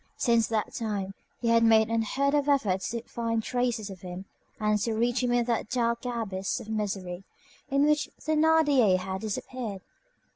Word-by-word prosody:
Since 235 -2 +3
that 220 -2 -1
time, 200 -4 -3 0.3
he 235 - +1
had 230 0 +5
made 220 -1 +5
unheard 260 +5 +1
of 290 -1 +2
efforts 205 -10 +1
to 235 0 -4
find 230 -2 -2
traces 240 -4 -1
of 185 -2 -11
him 180 +1 -7 0.3
and 210 -1 +2
to 225 +2 -1
reach 240 +3 +1
him 250 -1 +1
in 240 -1 +2
that 230 -2 -1
dark 235 -1 0
abyss 210 -6 -2
of 215 - -10
misery 195 -4 -3 0.5
in 280 +1 +3
which 300 0 +2
Thénardier 305 -9 +4
had 190 +1 -4
disappeared. 220 -1 -4
230 Hz, 170 wpm, -28 LUFS, 205-250 Hz, 0.5 s, had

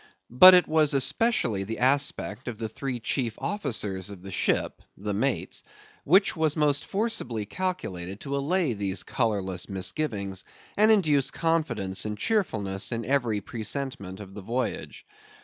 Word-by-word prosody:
But 185 +10 +10
it 180 - +4
was 155 -2 +2
especially 135 - +2
the 110 +3 -5
aspect 130 -4 0
of 120 -3 -4
the 110 0 -3
three 125 +2 -4
chief 115 0 -2
officers 105 - -3
of 95 -3 -10
the 95 - -8
ship, - - 0 0.2
the 105 +2 -3
mates, 125 +6 -1 0.4
which 190 +7 +4
was 160 -2 +1
most 150 -1 +2
forcibly 195 - -2
calculated 100 - -4
to 140 0 -4
allay 150 0 0
these 100 -2 -1
colourless 100 -7 -2
misgivings, 100 0 -2 0.3
and 215 +2 +4
induce 150 -11 +4
confidence 140 - -1
and 105 -1 -4
cheerfulness 105 - -1
in 115 -1 -2
every 120 -5 0
presentment 110 -4 -5
of 100 -2 -10
the 105 - -8
voyage. 120 +6 -4
120 Hz, 145 wpm, -26 LUFS, 100-150 Hz, 0.4 s, But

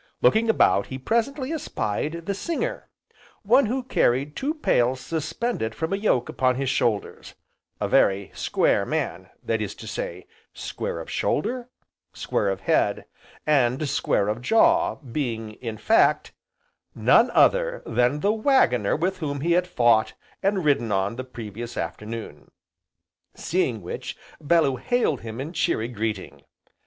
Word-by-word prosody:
Looking 225 +1 +4
about 100 - +3
he 130 - -5
presently 255 - -1
espied 165 - -3
the 200 - -1
singer, 340 - -3 0.5
one 235 +4 +4
who 255 +4 -1
carried 140 - +1
two 295 +4 -2
pails 130 - +1
suspended 160 - -3
from 160 +3 -2
a - - +3
yoke 195 - +1
upon 130 -1 +1
his 135 0 -1
shoulders, 110 -5 -1 0.4
a - - -1
very 95 0 +2
square - - +1
man; - - -3
that 115 -1 -1
is 105 - -4
to - - -11
say, - - -5 0.3
square - - -4
of - - -8
shoulder, 245 - -1 0.4
square - - -1
of - - -3
head, - - +1 0.4
and 140 0 +2
square 100 -6 +1
of 110 +3 -2
jaw, 335 - +3
being, 115 -5 -4
in 115 -3 -5
fact, 220 - +3 0.6
none - - +5
other - - +3
than 125 +4 +1
the 205 +2 +2
Waggoner 215 - +3
with 185 +4 -1
whom 145 -4 -3
he 170 +3 0
had 180 +1 +3
fought, 120 -9 +3 0.3
and 195 -3 0
ridden 130 -7 +2
on 95 +3 0
the 130 - -5
previous 120 -1 -8
afternoon; 105 +7 -6 0.9
seeing 130 - -1
which, 85 - -6 0.2
Bellew 150 -4 +3
hailed 245 - 0
him 115 +1 -7
in 150 +6 -5
cheery 115 -8 0
greeting. 110 -4 -4
140 Hz, 145 wpm, -24 LUFS, -, 0.9 s, none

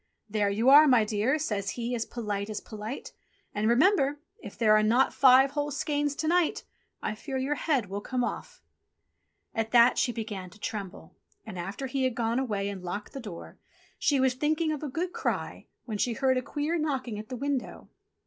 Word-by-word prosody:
"There 205 -1 0
you 220 +6 +2
are, 300 +2 +9
my 245 -5 +5
dear," 215 +7 +1
says 200 -9 -2
he 240 +1 -2
as 230 -2 -2
polite 210 -3 -4
as 210 -1 -3
polite. 215 +4 -7 0.4
"And 210 +2 0
remember! 285 - +3 0.2
if 205 - -10
there 215 -2 +5
are 215 - +5
not 235 +5 +3
five 265 0 +6
whole 290 0 -2
skeins 290 0 -1
to 310 - -2
night, 345 0 +2 0.4
I - - -1
fear 265 +5 -5
your 265 +3 0
head 280 -6 0
will 200 +1 -5
come 250 +3 -2
off - - -5 0.4
!" - - -50
At 225 0 -1
that 240 +1 +6
she 245 - +2
began 210 -5 -6
to 205 - -18
tremble, 205 -4 -6 0.3
and 190 -5 -7
after 195 +10 -5
he 265 +1 -2
had 255 -2 0
gone 230 +1 0
away 210 -6 -1
and 200 -2 -5
locked 180 +4 -6
the 275 - -5
door, 205 -9 -9 0.4
she 285 -2 +2
was 260 -1 +3
just 255 - -20
thinking 310 +1 +1
of 300 - -3
a 300 - -4
good 345 +6 -3
cry, - - -3 0.2
when 215 -4 -4
she 240 - +1
heard 260 +3 +2
a - - +1
queer 300 +6 -2
knocking 260 -8 -2
at 215 - -9
the 255 - -5
window. 275 0 -3
245 Hz, 205 wpm, -28 LUFS, 215-280 Hz, 0.4 s, are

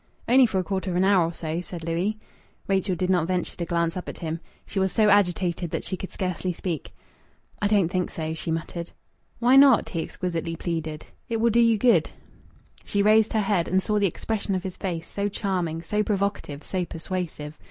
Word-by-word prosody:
"Only 255 +1 +6
for 200 - -2
a 185 - +1
quarter 190 0 -2
of 175 - -2
an 180 - +3
hour 190 -3 +4
or - - -4
so," 160 +1 -3
said 175 -2 -8
Louis. 175 +6 -1 0.5
Rachel 195 -1 +1
did 185 +2 0
not 175 -3 +2
venture 180 -1 -1
to 170 - -3
glance 170 0 0
up 180 - -5
at - - -7
him. 165 0 -4 0.3
She 195 - -3
was 190 -1 +1
so 215 -1 +3
agitated 180 -3 +2
that - - -3
she 185 - -3
could 190 - -7
scarcely 185 -1 -2
speak. 165 -3 -4 0.7
"I 205 - +3
don't 200 -5 +3
think 180 0 -1
so," 160 -1 -4
she 160 - -5
muttered. 165 +1 -3 0.5
"Why 245 +3 +5
not?" 275 -4 +6
he 165 - -2
exquisitely 170 -1 -3
pleaded. 160 -2 -4 0.2
"It 230 - 0
will 230 +1 +3
do 235 - +3
you 230 -2 +5
good." 240 +2 +4 0.7
She 200 0 0
raised 215 +1 +4
her 220 - +2
head 195 -4 +1
and 190 +1 +2
saw 210 -1 +1
the 200 - +3
expression 200 +2 -2
of 185 - -2
his 190 -2 -5
face, 170 -3 -4
so 200 0 -2
charming, 180 -5 -2
so 210 +2 0
provocative, 200 -8 -2
so 185 -1 -2
persuasive. 165 -3 -5
185 Hz, 210 wpm, -25 LUFS, 170-205 Hz, 0.7 s, Only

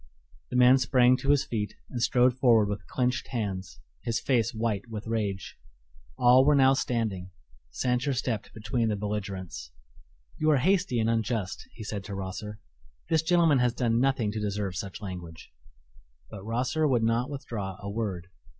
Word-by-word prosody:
The - - -5
man 125 +1 +6
sprang 125 0 +4
to 135 - -4
his 145 -1 +4
feet 105 -4 -3 0.2
and 125 - -4
strode 125 +1 +4
forward 115 -5 +4
with 105 0 -5
clenched 125 0 -1
hands, 95 -7 -4 0.2
his 115 -1 -1
face 120 -3 +1
white 110 -1 -2
with 110 -2 -6
rage. 105 -4 -3 0.6
All 125 0 +6
were 145 +1 +4
now 135 -1 +5
standing. 110 -8 -2 0.4
Sancher 125 - 0
stepped 115 -3 -3
between 110 +1 -1
the 105 - 0
belligerents. 100 -10 -5 0.7
"You 155 - +2
are 150 - +5
hasty 180 -4 +2
and 110 - +1
unjust," 110 -3 -2
he 115 - -8
said 105 -2 -5
to 100 - -6
Rosser; 100 +3 -6 0.5
"this 160 -2 +4
gentleman 165 -4 +3
has 120 -1 +1
done 120 -2 +1
nothing 130 -5 +1
to 110 - -4
deserve 100 -2 -2
such 95 +3 -6
language." 90 - -8 0.8
But 100 -3 -8
Rosser 125 +8 0
would 125 -5 +2
not 115 +2 +1
withdraw 105 -9 -5
a 100 - -8
word. 100 -4 -3
115 Hz, 165 wpm, -28 LUFS, 100-125 Hz, 0.8 s, man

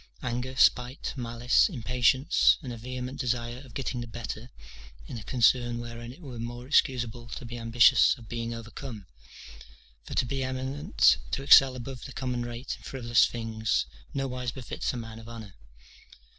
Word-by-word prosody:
Anger, 125 +1 -3
spite, 125 0 +2
malice, 120 - +2
impatience, 125 - +3
and 125 -3 -5
a - - -7
vehement 125 +2 -6
desire 120 -1 -2
of 125 -5 -15
getting 130 -2 -3
the 120 - -6
better 115 +1 -6 0.6
in 115 - -7
a - - -10
concern 120 0 +3
wherein 120 0 -7
it 155 - -14
were 125 -5 -8
more 120 +1 -6
excusable 120 -4 +1
to 120 - -7
be 120 +1 -7
ambitious 120 +3 +5
of 115 -3 -14
being 115 0 -4
overcome; 115 -1 -8 1.0
for - - -7
to - - +2
be 135 +1 -2
eminent, 130 - +2
to 135 - -2
excel 135 -2 +8
above 130 0 -7
the 135 - -8
common 125 -2 -2
rate 120 +2 -5
in - - -21
frivolous 120 -3 +2
things, 110 -2 -1 0.3
nowise 125 -3 -3
befits 125 -1 -4
a - - -5
man 115 -1 -7
of 115 0 -11
honour. 110 -4 -9
120 Hz, 165 wpm, -28 LUFS, 115-130 Hz, 1.0 s, excel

